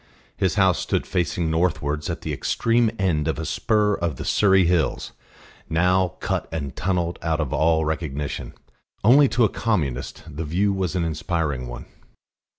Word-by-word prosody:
His 95 0 0
house 95 -4 +3
stood - - -1
facing 85 -2 -1
northwards 75 -3 0
at - - -4
the - - -3
extreme 115 0 +1
end 80 -7 0
of 80 - -1
a 80 - -4
spur 105 +4 +1
of 85 -6 -2
the - - -7
Surrey 95 -3 +4
Hills, 85 -2 0 0.6
now 90 +2 +2
cut - - -2
and 70 -5 -4
tunnelled 90 -2 -1
out 80 -1 -1
of 75 -5 -2
all 80 0 +2
recognition; 75 -2 -4 0.5
only 135 +7 +7
to 115 0 +3
a - - +4
Communist 75 - -2
the 80 +1 -5
view 95 +6 +1
was 95 -2 -2
an 85 -2 0
inspiriting 75 -5 -2
one. - - -8
85 Hz, 160 wpm, -23 LUFS, 75-95 Hz, 0.6 s, only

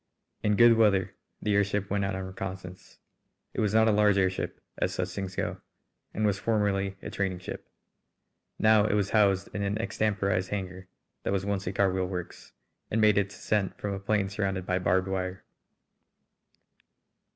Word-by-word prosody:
In 105 0 +2
good 120 +1 +7
weather 100 -4 +3 0.3
the 105 - +1
airship 100 -1 +1
went 100 0 +1
out 95 -1 -2
on 95 - -4
reconnoissance. 95 -1 -7 0.6
It - - -1
was 105 -2 +1
not 110 0 +5
a - - +5
large 105 -1 +4
airship, 95 -1 0 0.2
as 90 - 0
such 90 0 -1
things 95 0 -5
go, - - -3 0.5
and 110 - -1
was 100 -1 +1
formerly 100 -3 0
a - - -6
training 95 -2 -1
ship. 90 - -8 0.9
Now 110 -1 +5
it 105 - +1
was 100 -1 0
housed 100 -3 +2
in 105 - -3
an 100 +1 -1
extemporised 100 -3 0
hangar 95 -2 -5 0.3
that - - -1
was 95 0 -1
once 100 -2 -2
a - - 0
carwheel 95 -1 +1
works, 90 -2 -7 0.4
and 110 - 0
made 105 -2 +5
its 100 0 -2
ascent 105 -3 -1
from 100 -1 -3
a 100 - -4
plain 100 0 0
surrounded 95 -2 -2
by 90 0 0
barbed 90 +1 +1
wire. 95 -1 -3
100 Hz, 175 wpm, -28 LUFS, 95-105 Hz, 0.9 s, good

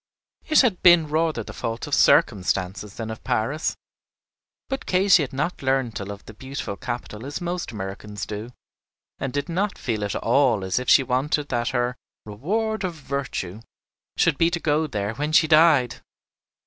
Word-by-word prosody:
It 310 - +6
had 225 -9 +1
been 175 -4 +6
rather 155 -5 0
the - - -9
fault 115 0 -4
of - - -7
circumstances 95 +1 +2
than 115 -1 -5
of 110 - -9
Paris; 135 +9 -1 0.9
but 270 +1 -4
Katy 185 -1 +5
had 140 - -3
not 150 +6 -2
learned 130 -4 0
to 100 - -4
love 100 0 -8
the 110 - -11
beautiful 130 -2 -6
capital 120 -1 -6
as 140 +2 -5
most 175 -3 -3
Americans 105 0 -6
do, 105 +3 -6 0.7
and 135 - -3
did 145 +4 -2
not 190 +4 -1
feel 110 -4 -2
at 100 - -2
all 120 -4 +2
as 95 +4 0
if 125 - -3
she 135 - +7
wanted 140 +3 0
that 120 -1 -1
her 125 -1 -1 0.3
"reward 210 - -2
of 180 -3 -3
virtue" 135 - -4 0.6
should 165 -5 +2
be 165 - +4
to 175 0 -2
go 155 0 +1
there 105 -5 -3
when 150 +5 -3
she 160 - +6
died! 155 -6 +4
135 Hz, 175 wpm, -24 LUFS, 110-160 Hz, 0.9 s, she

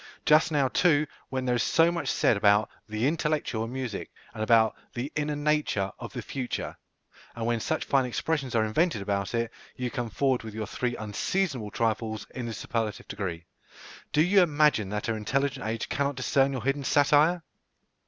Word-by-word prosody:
Just 155 +1 +5
now, 145 -3 +3
too, 155 +1 +3 0.2
when 130 -1 -2
there 125 - +2
is 120 - +1
so 165 +7 +4
much 170 -1 -3
said - - +3
about 105 +1 +3 0.2
"the 110 +2 -1
intellectual" 150 -7 0
in 115 - -7
music, 130 -6 -4 0.2
and 110 - -6
about 110 0 +4 0.2
"the 125 +5 -3
inner 150 0 -1
nature 145 -10 0
of - - -7
the - - -5
future," 130 -3 -4 0.6
and 115 -1 -3
when 120 0 +1
such - - -1
fine 135 -2 +2
expressions 135 0 -2
are 110 -1 +3
invented 110 - +1
about 100 +1 -1
it, 115 -1 -1 0.2
you 125 -1 -3
come 120 -4 -3
forward 130 +2 +1
with 110 -1 -8
your 110 -1 -3
three 120 +4 -2
unseasonable 120 - -2
trifles 110 -1 -1
in 125 -2 -4
the 115 - -4
superlative 110 0 -3
degree. 85 -4 -4 0.7
Do 150 - +4
you 195 +3 +5
imagine 150 - +3
that 105 0 -3
our 115 - 0
intelligent 135 +3 -1
age 115 0 -2
cannot 140 +1 -1
discern 135 +1 +2
your 130 -4 -4
hidden 135 +2 0
satire? 150 +5 +4
125 Hz, 185 wpm, -28 LUFS, 110-145 Hz, 0.7 s, Just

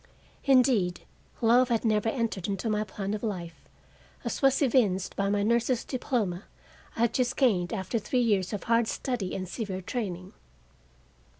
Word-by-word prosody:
Indeed, 250 -10 +3 0.4
love 240 +2 +5
had 235 0 0
never 215 0 +2
entered 225 -7 -2
into 200 +2 -2
my 210 0 +1
plan 200 0 -4
of 215 - -3
life, 175 -7 -5 0.6
as - - -3
was 270 -1 +4
evinced 210 -8 +2
by 200 0 0
the 205 0 +1
nurse's 235 +2 +1
diploma 220 -8 -2 0.5
I - - -3
had 235 -1 +2
just 255 0 0
gained 195 -10 +2
after 190 +5 -2
three 255 - -2
years 200 -5 +1
of 210 - -4
hard 230 0 +2
study 230 -9 -3
and 185 -1 -4
severe 195 -1 -4
training. 185 -5 -4
215 Hz, 160 wpm, -28 LUFS, 190-240 Hz, 0.6 s, love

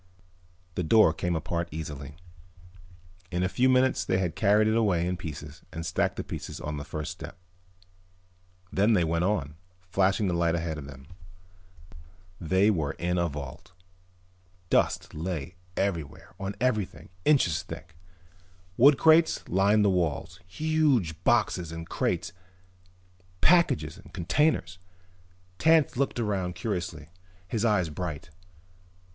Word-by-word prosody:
The 90 - -2
door 90 -1 +5
came 85 +1 -2
apart 85 +1 -2
easily. 75 -3 -7 1.1
In 90 +1 -1
a - - +2
few 125 +7 +2
minutes 130 0 +3
they 95 - 0
had 90 -3 -1
carried 105 +1 +4
it 110 - +2
away 95 -7 +2
in 90 +1 -1
pieces 75 -3 -8
and 80 0 -6
stacked - - 0
the - - -4
pieces - - -7
on 75 0 -4
the 70 - -5
first 75 +2 -5
step. 90 +2 -9 1.4
Then 105 +4 +3
they 90 -5 +3
went 85 +2 0
on, 80 -7 -1 0.3
flashing 95 +2 +2
the 90 - 0
light 85 -1 +1
ahead 80 -2 -3
of 70 - -8
them. 70 -1 -11 1.3
They 95 +5 +3
were 80 -8 -1
in 90 +1 -1
a 85 - +2
vault. 70 +3 -8 1.0
Dust - - +1
lay 85 0 -4 0.2
everywhere, 85 -8 -3
on 100 +1 -4
everything, 105 -10 -1
inches 90 - +3
thick. 80 +2 -10 0.8
Wood 140 +3 +7
crates 160 +1 +4
lined 100 +3 +3
the 100 - +4
walls, 85 -5 -1
huge 130 - +1
boxes 90 -8 +2
and 80 0 -7
crates, 85 - -2 1.1
packages 90 - +3
and - - -16
containers. 90 - 0 0.8
Tance 160 -3 +4
looked 135 -1 -1
around 95 -5 -1
curiously, 90 -6 -4 0.4
his 110 +3 -2
eyes 105 -7 +2
bright. 80 -1 -5
90 Hz, 135 wpm, -27 LUFS, 80-105 Hz, 1.4 s, Wood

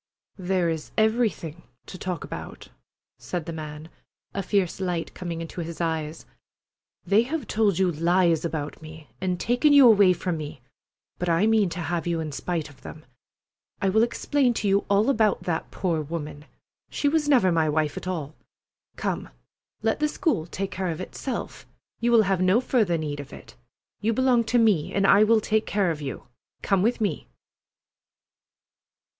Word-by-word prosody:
"There 185 -1 0
is 160 -2 -3
everything 215 -8 0 0.2
to - - -10
talk 185 -1 -4
about," - - -8 0.5
said 175 -4 -4
the 165 - -5
man, 155 0 -7 0.5
a 195 - -2
fierce 195 -2 0
light 175 -3 -2
coming 170 -2 -5
into 165 +1 -6
his 165 0 -7
eyes. 160 -2 -3 0.8
"They 205 +2 +4
have 280 +3 -3
told 210 -4 +1
you 185 -2 +2
lies 170 0 +2
about 155 -3 -4
me, 155 -4 -12
and 180 -1 -1
taken 245 +6 +3
you 280 -2 +8
away 200 -5 +6
from 175 -1 -3
me, 150 -4 -7 0.6
but 180 - -1
I 170 +4 +3
mean 220 -3 +3
to 170 +1 -5
have 170 +1 -2
you 170 -1 0
in 155 -2 -4
spite 165 +2 -3
of 145 - -17
them. 155 - -10 0.7
I 195 - +1
will 220 +3 +3
explain 245 +2 +1
to 210 - -1
you 200 +1 +2
all 200 +2 +3
about 220 -7 +2
that 165 -2 -2
poor 170 -4 -1
woman. 150 -1 -6 0.4
She 290 - -1
was 295 0 +1
never 240 -10 +4
my 160 -2 +2
wife 150 -1 0
at - - -6
all. 160 -5 -3 0.6
Come, - - -3 0.5
let 225 +4 +1
the 300 - +2
school 300 - -1
take 195 +3 -4
care 190 -2 -2
of 160 - -4
itself. 235 +6 -6 0.3
You 240 +1 +1
will 230 -2 +6
have 190 -2 0
no 185 +5 +4
further 220 -9 +1
need 150 -2 -4
of 145 -1 -8
it. - - -12 0.4
You 225 +2 0
belong 250 -1 +3
to 235 +2 +1
me, 210 -10 +2
and 195 0 +2
I 200 +2 +6
will 220 0 +4
take 215 +1 0
care 195 -4 +1
of 155 -2 -5
you. 135 -2 -5 0.4
Come 195 -2 +2
with 235 +5 +1
me!" 205 - -1
185 Hz, 175 wpm, -25 LUFS, 160-220 Hz, 0.8 s, you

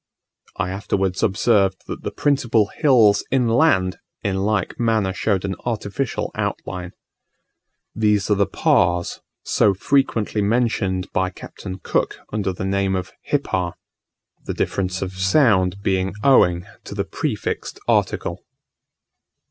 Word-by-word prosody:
I 90 - -1
afterwards 95 -1 -1
observed 100 -2 +2
that - - -6
the - - -3
principal 120 -7 +1
hills 115 -9 +4
inland 120 - +2 0.2
in 95 -1 0
like 100 0 -1
manner 110 -5 +1
showed 100 -1 0
an 95 - -2
artificial 115 +2 -2
outline. 90 0 -4 1.0
These 105 -1 +1
are - - +5
the 100 0 +2
Pas, 95 - +1 0.2
so 100 -2 +3
frequently 110 -1 +1
mentioned 100 -4 0
by 95 0 +1
Captain 95 0 -9
Cook 95 - -1 0.2
under 100 -3 0
the 95 +1 -5
name 95 0 0
of 95 0 -4
"hippah;" 95 - -1 0.7
the - - -4
difference 95 -1 -1
of 95 0 -5
sound 95 -3 +3
being 95 0 0
owing 90 -11 +4 0.2
to - - -7
the - - -1
prefixed - - -3
article. - - 0
100 Hz, 125 wpm, -21 LUFS, 95-115 Hz, 1.0 s, are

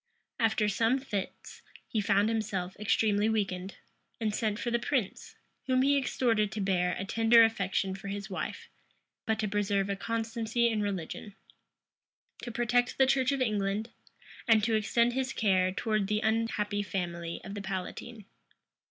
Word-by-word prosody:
After 220 -2 +2
some 225 +5 +2
fits, 210 -8 -6 0.3
he 220 - -1
found 200 +1 +3
himself 200 -5 -2
extremely 210 0 +2
weakened, 195 -3 -2 0.4
and 220 -2 -1
sent 215 -1 -1
for 240 +1 -3
the 235 - +2
prince, 235 -6 -2 0.3
whom 255 0 +3
he 285 +1 +4
exhorted 230 -6 +1
to 215 - -4
bear 180 -2 +1
a 190 - -3
tender 225 +2 +5
affection 195 -3 0
for 195 +1 -8
his 200 0 -4
wife, 190 -3 -5 0.6
but 220 0 +1
to 215 0 -1
preserve 200 -1 0
a - - -1
constancy 230 +2 -1
in 220 -2 0
religion; 200 0 -4 1.1
to 240 - -5
protect 240 +1 +1
the 265 - +6
church 265 0 +2
of 275 -1 -1
England; 210 -1 -1 0.6
and 220 -2 +5
to 225 +1 +1
extend 235 +2 +2
his 265 +1 -1
care 185 -3 +2
towards 215 0 -1
the 210 +1 0
unhappy 220 -2 0
family 170 -3 -4
of 195 - -7
the 205 - -5
palatine. 195 +3 -6
215 Hz, 155 wpm, -30 LUFS, 195-230 Hz, 1.1 s, the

